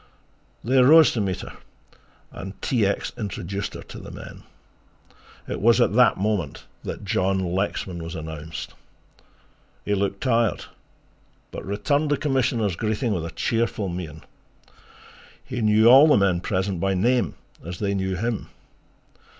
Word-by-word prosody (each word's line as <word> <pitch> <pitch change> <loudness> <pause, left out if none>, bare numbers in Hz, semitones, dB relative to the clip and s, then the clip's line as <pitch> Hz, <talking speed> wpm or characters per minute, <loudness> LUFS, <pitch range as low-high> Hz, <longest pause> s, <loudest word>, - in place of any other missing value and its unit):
They 130 +3 +4
rose 155 +5 +7
to 115 - -1
meet 95 -3 -2
her - - -9 0.8
and 95 +1 -8
T. 115 -6 +1
X. 100 - -2
introduced 100 -1 -4
her - - -8
to - - -10
the - - -10
men. - - -10 1.1
It - - -4
was 115 +3 +5
at 120 - +3
that 125 +1 +5
moment 100 -7 -2 0.2
that 105 - -6
John 95 0 +1 0.2
Lexman 95 -2 -2
was 80 +1 -6
announced. 80 0 -7 1.1
He 105 - 0
looked 100 0 -1
tired, 115 -4 +1 0.9
but - - -7
returned 140 +10 0
the 145 - +2
Commissioner's 125 - 0
greeting 110 +3 -1
with 85 -4 -2
a - - -6
cheerful 110 +3 -1
mien. 80 -3 -6 1.2
He 125 -3 -4
knew 110 +1 +4
all 135 +5 +9
the 150 - +5
men 95 -3 +2
present 95 -1 -1
by 95 +2 0
name, 120 +6 +1 0.3
as 85 +2 -6
they 100 0 -1
knew 95 -1 -1
him. 115 +3 -3
100 Hz, 145 wpm, -24 LUFS, 95-120 Hz, 1.2 s, all